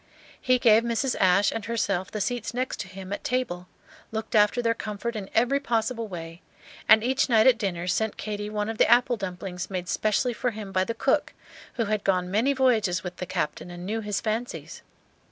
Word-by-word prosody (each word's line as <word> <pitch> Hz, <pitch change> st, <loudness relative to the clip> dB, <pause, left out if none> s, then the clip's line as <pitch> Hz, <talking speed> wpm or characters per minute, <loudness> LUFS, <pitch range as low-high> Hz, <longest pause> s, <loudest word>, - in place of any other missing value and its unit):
He 255 Hz, 0 st, +3 dB
gave 225 Hz, -3 st, +5 dB
Mrs. 235 Hz, +2 st, -1 dB
Ashe 190 Hz, +2 st, +4 dB
and 225 Hz, -2 st, -4 dB
herself 200 Hz, -5 st, -1 dB
the 215 Hz, -, -4 dB
seats 245 Hz, +1 st, -2 dB
next 255 Hz, +1 st, -2 dB
to 200 Hz, -, -4 dB
him 190 Hz, +1 st, -7 dB
at -, -, -5 dB
table, 230 Hz, -9 st, -2 dB, 0.4 s
looked 220 Hz, 0 st, -4 dB
after 210 Hz, +2 st, +4 dB
their 230 Hz, -1 st, +2 dB
comfort 225 Hz, +1 st, -5 dB
in 200 Hz, -3 st, -5 dB
every 245 Hz, +5 st, +3 dB
possible 230 Hz, -2 st, -1 dB
way, 165 Hz, -2 st, -8 dB, 0.5 s
and 220 Hz, 0 st, +7 dB
each 265 Hz, +4 st, +1 dB
night 220 Hz, -2 st, +5 dB
at 255 Hz, -3 st, +5 dB
dinner 180 Hz, -5 st, -2 dB
sent 215 Hz, +4 st, -1 dB
Katy 210 Hz, -1 st, -4 dB
one 210 Hz, 0 st, -2 dB
of 225 Hz, 0 st, -5 dB
the -, -, +5 dB
apple 245 Hz, +1 st, +5 dB
dumplings 185 Hz, -3 st, -5 dB
made 180 Hz, -2 st, -4 dB
specially 215 Hz, +6 st, +1 dB
for 250 Hz, -, -1 dB
him 210 Hz, -3 st, -7 dB
by 185 Hz, -1 st, +2 dB
the 230 Hz, -, -3 dB
cook, 275 Hz, +4 st, +1 dB, 0.4 s
who 230 Hz, -, 0 dB
had 210 Hz, -1 st, -1 dB
gone 180 Hz, -2 st, +1 dB
many 225 Hz, +8 st, +2 dB
voyages 225 Hz, -10 st, +2 dB
with 180 Hz, 0 st, -6 dB
the 180 Hz, -, -5 dB
Captain 180 Hz, -2 st, -3 dB
and 175 Hz, 0 st, -8 dB
knew 220 Hz, +3 st, -2 dB
his 210 Hz, -2 st, -2 dB
fancies. 225 Hz, +3 st, -4 dB
215 Hz, 205 wpm, -26 LUFS, 190-235 Hz, 0.5 s, and